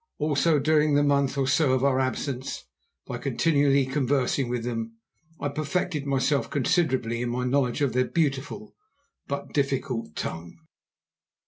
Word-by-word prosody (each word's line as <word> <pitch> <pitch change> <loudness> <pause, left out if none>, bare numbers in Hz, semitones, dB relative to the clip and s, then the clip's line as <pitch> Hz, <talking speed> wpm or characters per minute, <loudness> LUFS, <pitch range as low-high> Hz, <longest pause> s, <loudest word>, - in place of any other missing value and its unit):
Also, 150 +1 +2
during 150 0 +3
the 145 - +4
month 140 -1 +2
or 135 -1 +1
so 135 0 +3
of 130 0 +1
our 135 -1 +3
absence, 130 0 -3 0.4
by - - -5
continually 140 -4 +2
conversing 135 -1 0
with 120 -1 -2
them, 115 -1 -4 0.4
I 145 - -1
perfected 150 0 -2
myself 140 +1 +1
considerably 130 -5 0
in 120 - -1
my 125 +1 -2
knowledge 130 +1 +1
of 140 -5 +1
their 125 0 +2
beautiful 155 +8 -2 0.5
but 140 0 -5
difficult 135 - -1
tongue. 85 +1 -5
140 Hz, 140 wpm, -26 LUFS, 125-145 Hz, 0.5 s, the